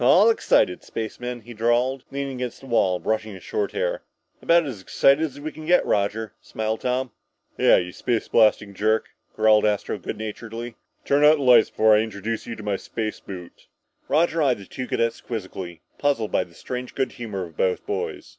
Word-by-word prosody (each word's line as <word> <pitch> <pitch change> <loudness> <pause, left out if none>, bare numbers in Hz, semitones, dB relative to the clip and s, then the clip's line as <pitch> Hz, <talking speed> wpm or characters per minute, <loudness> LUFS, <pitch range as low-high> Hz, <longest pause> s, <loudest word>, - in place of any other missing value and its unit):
"All 195 - +6
excited, 90 - +2
spacemen?" 120 +2 -5
he 120 +2 -11
drawled, 120 +4 +1
leaning 140 -1 -4
against 125 -2 -5
the - - -12
wall, 105 -7 +2
brushing 110 +1 -2
his - - -12
short 420 -2 -2
hair. - - -1 0.4
"About 170 -1 +4
as 120 -9 -6
excited 140 +10 +3
as 145 -3 -4
we 155 +2 -5
can 155 0 -10
get, 180 +1 +4
Roger," 105 +2 0
smiled 110 0 -3
Tom. 125 0 -1 0.4
"Yeah, - - +5
you 90 0 -2
space 120 +4 -2
blasting 105 -2 +3
jerk!" 110 +3 +1 0.3
growled 110 -1 +5
Astro 105 -1 0
good - - -5
naturedly. 115 +2 -6 0.3
"Turn 140 +1 +3
out 150 +1 +7
the 145 - -3
lights 125 -3 +6
before 110 0 +4
I - - +4
introduce 110 0 -3
you 115 - -4
to 110 - -10
my 100 -2 -1
space 110 +1 -4
boot." 90 -3 -10 0.4
Roger 165 +1 +2
eyed 135 -4 +3
the 100 - -11
two 130 +6 -6
cadets 115 -1 -1
quizzically, 95 -6 -6 0.2
puzzled 135 -7 0
by - - +1
the 85 - -21
strange 125 0 -6
good 135 - 0
humor 105 -6 -5
of 80 -2 -14
both 95 +2 0
boys. - - -4
115 Hz, 195 wpm, -24 LUFS, 105-135 Hz, 0.4 s, out